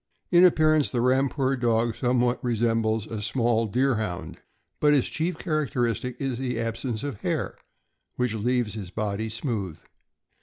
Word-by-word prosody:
In 175 0 +7
appearance, 155 -4 +4
the 125 - -1
Rampur 135 +2 +2
Dog 115 -2 +1
somewhat 125 -1 +1
resembles 115 -2 +1
a 110 -1 -5
small 115 0 +1
Deerhound, 110 -6 -1 0.4
but 150 0 +4
his 140 -4 +3
chief 165 +2 -2
char 155 -4 +1
acteristic 120 0 -1
is 135 -3 -2
the 125 -3 -2
absence 115 0 -3
of 140 -8 -5
hair, - - -2 0.6
which 125 -3 0
leaves 120 0 0
his 100 -5 -6
body 105 +2 -2
smooth. 110 - -3
120 Hz, 145 wpm, -26 LUFS, 110-135 Hz, 0.6 s, In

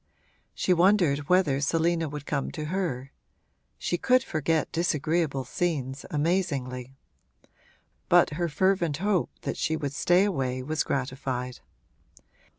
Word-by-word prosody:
She 185 - +2
wondered 170 -6 +3
whether 170 -7 +3
Selina 165 +2 +1
would 145 0 -7
come 140 - -2
to 155 -2 -4
her 135 -9 -2 0.7
(she 175 - -2
could 255 0 +3
forget 160 0 0
disagreeable 160 -4 0
scenes 140 -4 -2
amazingly); 140 -6 -1 1.1
but - - +5
her 170 +3 -1
fervent 170 -1 +1
hope 195 0 +1
that - - -3
she 160 - 0
would 145 -3 -3
stay 175 +5 +3
away 130 -10 -1
was 155 +3 -1
gratified. 130 -2 -3
155 Hz, 120 wpm, -27 LUFS, 135-175 Hz, 1.1 s, but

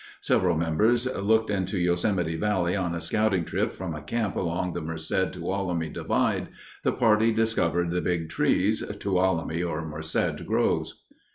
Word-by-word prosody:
Several - - +2
members 105 +10 +2
looked 110 +2 +2
into 95 -1 -1
Yosemite 90 -1 +1
Valley 90 -1 0
on 90 -3 -1
a - - -3
scouting 100 -2 +1
trip - - -1
from 90 -3 -5
a 75 - -6
camp 105 +6 -2
along 90 0 -1
the 85 - -3
Merced 80 +3 -1
Tuolumne 90 -5 -2
divide. - - 0 0.3
The - - +1
party 115 -2 +3
discovered 90 -7 +1
the 90 0 0
Big 85 -2 -1
Trees 100 +6 +1 0.2
(Tuolumne 90 -4 0
or 80 -2 -3
Merced 80 +1 -2
groves). - - 0
90 Hz, 150 wpm, -26 LUFS, 85-105 Hz, 0.3 s, party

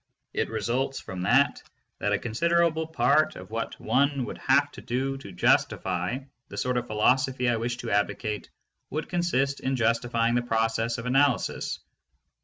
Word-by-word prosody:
It - - -1
results 120 +5 -1
from 95 -1 -7
that 135 +10 +3 0.4
that - - 0
a - - +3
considerable 165 +6 +1
part 150 0 +2
of 90 +3 -10
what 115 0 -4
one 135 +2 +1
would - - -7
have - - +3
to - - -10
do 135 +3 -2
to 100 -7 -10
justify 90 +3 +1 0.3
the - - -9
sort 125 0 0
of 120 0 -2
philosophy 125 +4 +2
I 120 -1 +2
wish 120 +2 -2
to 120 -2 -5
advocate 105 +1 -1 0.4
would 155 +3 -4
consist 140 -6 0
in 135 0 -1
justifying 115 0 +1
the 120 - +2
process 115 0 0
of 115 - -6
analysis. 135 0 +1
120 Hz, 160 wpm, -27 LUFS, 115-135 Hz, 0.4 s, that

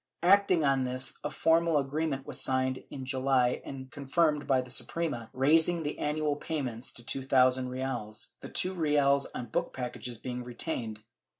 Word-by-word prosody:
Acting 185 -3 +5
on 135 -1 +3
this, 130 +1 -1
a 150 - -1
formal 165 +2 +3
agreement 140 0 -1
was - - 0
signed 130 0 0
in 135 -2 -7
July 130 -1 +1
and 130 -1 -8
confirmed 150 +1 +1
by 135 -1 +4
the 125 -1 -5
Suprema, 130 -5 -2
raising 160 +5 +3
the 150 - -3
annual 150 0 0
payment 135 -6 -4
to 120 - -8
two 135 - -1
thousand 130 -1 +3
reales, 125 -4 -4
the - - -8
two 185 - 0
reales 145 -4 +2
on 125 - -4
book - - -1
packages 125 -1 -4
being 125 +1 -5
retained. 120 -3 -4
135 Hz, 165 wpm, -30 LUFS, 125-150 Hz, -, Acting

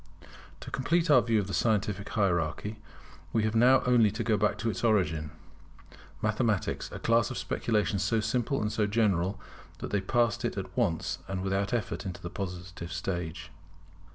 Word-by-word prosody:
To - - -8
complete 165 +5 +1
our 130 -4 +7
view 115 -1 +1
of 100 - -1
the 95 - -6
scientific 105 0 0
hierarchy 100 +1 0 0.5
we 110 - +1
have 110 0 0
now 125 +4 +5
only 120 -4 +5
to 110 +4 -3
go 110 -1 +2
back 105 +1 +1
to 115 - -1
its 95 - -6
origin, 80 -9 +2 0.9
Mathematics; 110 -2 0
a - - -6
class 115 -1 +2
of - - -5
speculations 105 -3 0
so 105 +3 +1
simple 120 +5 0
and 105 - -1
so 105 -1 +1
general, 100 -3 +1 0.4
that - - -6
they 100 - +1
passed 120 +2 +1
at - - -3
once 80 - 0
and 95 -1 -3
without 95 +1 0
effort 120 -3 -2
into 90 -3 -5
the 85 -1 -7
Positive 90 -2 -6
stage. 85 -2 -4
105 Hz, 170 wpm, -29 LUFS, 95-115 Hz, 0.9 s, our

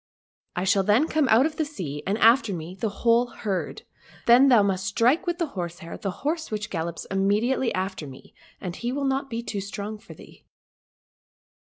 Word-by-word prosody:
I 180 - -1
shall 195 +1 +3
then 210 +10 +3
come 310 -4 +1
out 230 +5 +6
of 310 -1 -3
the 315 - +1
sea, 175 - -5
and 200 +2 +1
after 230 -1 +4
me 165 +1 -7
the 205 +4 -2
whole 235 +4 +2
herd; 200 -6 -4 0.4
then 245 +4 +7
thou 235 -5 +6
must 195 -1 -1
strike 240 - +2
with 345 -1 0
the 345 - 0
horsehair 175 -2 -6
the 195 - -4 0.2
horse 320 +2 -1
which 210 -1 -4
gallops 170 -1 -4
im.mediately 210 +7 +1
after 190 -4 -3
me, 130 -1 -13 0.3
and 180 -2 -5
he 240 +4 -3
will 280 +1 -2
not 270 0 -1
be 230 -1 -4
too 205 -4 -4
strong 205 +2 -6
for - - -13
thee." - - -16
210 Hz, 190 wpm, -25 LUFS, 190-250 Hz, 0.4 s, then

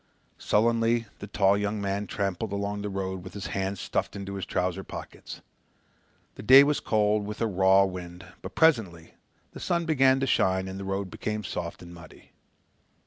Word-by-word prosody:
Sullenly 115 +1 +2
the 100 - -7
tall 100 -1 +3
young 105 +1 -2
man 100 0 -2
tramped 100 -4 -3
along 100 -1 -3
the 105 - -4
road 95 -2 -4
with - - -11
his 100 - -6
hands 95 0 -2
stuffed - - -3
into 100 0 -6
his 95 -3 -5
trouser 90 +1 -2
pockets. - - -9 0.9
The - - -10
day 130 +6 +8
was 145 +1 +1
cold 105 -1 +1
with 105 - -6
a 115 - +1
raw 95 -1 +4
wind, 90 -2 -7 0.2
but - - -9
presently 110 - +2 0.4
the - - -10
sun 170 -1 -1
began 135 -4 +3
to 135 - 0
shine 95 -6 +1
and 95 +1 -6
the 100 - -6
road 95 -1 -3
became 105 0 -4
soft 85 -2 -5
and 85 0 -11
muddy. 85 -2 -15
100 Hz, 180 wpm, -27 LUFS, 95-110 Hz, 0.9 s, day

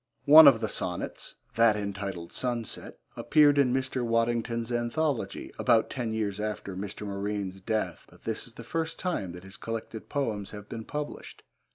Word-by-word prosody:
One 155 +1 +11
of 120 -5 +7
the 110 - 0
sonnets, 90 -4 -4 0.2
that 115 -2 +5
entitled 100 -4 -4
Sunset, 120 -3 -4 0.2
appeared 145 -2 +5
in 130 -3 +4
Mr. 130 -1 -1
Waddington's 115 0 0
anthology, 120 +3 -1
about 110 -1 +3
ten 120 -4 -2
years 105 -2 -2
after 105 -2 -3
Mr. 100 +2 -5
Morine's 100 -1 -3
death, 110 +2 -2
but - - -20
this 110 +1 -3
is 115 - -13
the 115 - -9
first 165 +6 -3
time 170 - -2
that 90 +1 -10
his 95 +1 -12
collected 115 -1 -6
poems 110 -9 -2
have 105 -1 -9
been 115 0 -6
published. 150 0 -6
115 Hz, 165 wpm, -28 LUFS, 105-125 Hz, 0.2 s, One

